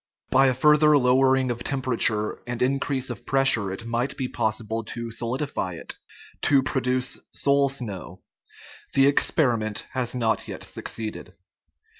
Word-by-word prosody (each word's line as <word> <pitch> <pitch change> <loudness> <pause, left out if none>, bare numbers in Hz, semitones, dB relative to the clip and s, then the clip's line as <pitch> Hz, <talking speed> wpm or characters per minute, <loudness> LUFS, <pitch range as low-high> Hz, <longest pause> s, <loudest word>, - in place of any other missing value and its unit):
By 135 +1 +5
a 130 - +2
further 150 +2 +5
lowering 130 0 +3
of 120 0 -5
temperature 120 -5 0
and 120 -1 -4
increase 135 0 -1
of 120 0 -8
pressure 135 -8 +3
it 95 +4 -6
might 120 +3 -2
be 130 - -2
possible 110 0 -2
to 115 +1 -6
solidify 115 -5 -3
it - - -5 0.4
to 140 -2 +4
produce 130 -2 -1
" - - -59
soul 140 0 +4
snow. 105 -9 -6 0.3
" - - -19
The 135 - +6
experiment 120 -7 +1
has 125 -1 -2
not 115 -2 0
yet - - -7
succeeded. 110 -1 -6
125 Hz, 145 wpm, -25 LUFS, 115-135 Hz, 0.4 s, The